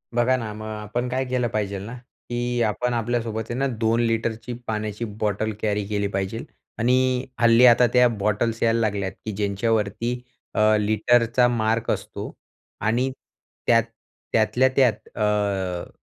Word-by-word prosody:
बघा 120 Hz, +2 st, +3 dB
ना, 110 Hz, -3 st, -5 dB
मग 110 Hz, 0 st, -8 dB
आपण 110 Hz, +3 st, -3 dB
काय 130 Hz, +1 st, -1 dB
केलं 125 Hz, -1 st, 0 dB
पाहिजेल 100 Hz, -2 st, -2 dB
ना, 115 Hz, -, -7 dB, 0.4 s
की 120 Hz, 0 st, -1 dB
आपण 120 Hz, +3 st, 0 dB
आपल्यासोबत 115 Hz, -1 st, -1 dB
आहे 120 Hz, -, -3 dB
ना, 135 Hz, -, +2 dB
2 115 Hz, -2 st, 0 dB
लिटरची 115 Hz, +1 st, -1 dB
पाण्याची 110 Hz, +1 st, -3 dB
बॉटल 105 Hz, +1 st, 0 dB
कॅरी 105 Hz, -1 st, 0 dB
केली 105 Hz, -1 st, -1 dB
पाहिजेल 95 Hz, +4 st, -3 dB, 0.3 s
आणि 125 Hz, +2 st, +2 dB
हल्ली 115 Hz, +1 st, +6 dB
आता 120 Hz, 0 st, +7 dB
त्या 125 Hz, 0 st, +6 dB
बॉटल्स 110 Hz, +1 st, -1 dB
यायला 115 Hz, 0 st, +3 dB
लागल्यात, 100 Hz, -3 st, -1 dB
की 110 Hz, -, -2 dB
ज्यांच्यावरती 105 Hz, +3 st, -1 dB, 0.3 s
अ, -, -, +1 dB, 0.2 s
लिटरचा 115 Hz, +3 st, +3 dB
मार्क 115 Hz, -1 st, 0 dB
असतो -, -, -4 dB, 0.5 s
आणि 120 Hz, +5 st, +1 dB, 0.6 s
त्यात 115 Hz, -1 st, +5 dB, 0.5 s
त्यातल्या 110 Hz, +4 st, +3 dB
त्यात 115 Hz, -5 st, +2 dB
अ, 100 Hz, -4 st, 0 dB
115 Hz, 140 wpm, -24 LUFS, 105-120 Hz, 0.6 s, आता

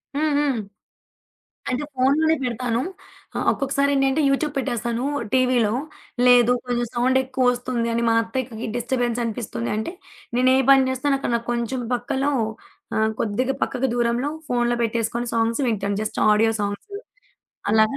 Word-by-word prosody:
హ్మ్. 305 Hz, 0 st, +1 dB
హ్మ్. 280 Hz, -5 st, +1 dB, 1.1 s
అంటే 260 Hz, +4 st, -1 dB
ఫోనులోనే 300 Hz, +5 st, +3 dB
పెడతాను. 240 Hz, -1 st, -1 dB, 0.6 s
ఆహ్, -, -, -1 dB
ఒక్కొక్కసారేంటంటే, 275 Hz, +1 st, +1 dB
యూట్యూబ్ 290 Hz, +2 st, 0 dB
పెట్టేస్తాను 240 Hz, -1 st, -1 dB, 0.3 s
టీవీలో. 250 Hz, -4 st, +3 dB, 0.5 s
లేదు 245 Hz, -1 st, +6 dB
కొంచెం 240 Hz, -1 st, -1 dB
సౌండెక్కువ 260 Hz, +1 st, +1 dB
వస్తుంది 245 Hz, -1 st, -2 dB
అని 230 Hz, 0 st, 0 dB
మా 225 Hz, -, +3 dB
అత్తయ్యకిక 230 Hz, -1 st, -4 dB
డిస్టర్బెన్స్ 240 Hz, 0 st, -1 dB
అనిపిస్తుంది 210 Hz, -, -3 dB
అంటే, 220 Hz, +9 st, -3 dB, 0.4 s
నేను 255 Hz, +1 st, +4 dB
ఏ -, -, +4 dB
పని 270 Hz, -1 st, +6 dB
చేస్తున్నానక్కడ 270 Hz, -1 st, 0 dB
నాకు 235 Hz, +1 st, -7 dB
కొంచెం 240 Hz, +1 st, -2 dB
పక్కలో 270 Hz, +3 st, -1 dB, 0.7 s
ఆహ్, 220 Hz, 0 st, +2 dB
కొద్దిగా 250 Hz, +5 st, 0 dB
పక్కకి 265 Hz, +1 st, 0 dB
దూరంలో 240 Hz, +3 st, 0 dB, 0.2 s
ఫోనులో 240 Hz, -1 st, +1 dB
పెట్టేసుకొని, 230 Hz, +1 st, -1 dB
సాంగ్స్ 230 Hz, +4 st, +1 dB
వింటాను 200 Hz, -2 st, -1 dB
జస్ట్ 215 Hz, -, -3 dB
ఆడియో 225 Hz, +2 st, +3 dB
సాంగ్స్. 205 Hz, -, -4 dB, 0.8 s
అలాగా 220 Hz, +4 st, +3 dB
245 Hz, 130 wpm, -23 LUFS, 230-265 Hz, 1.1 s, లేదు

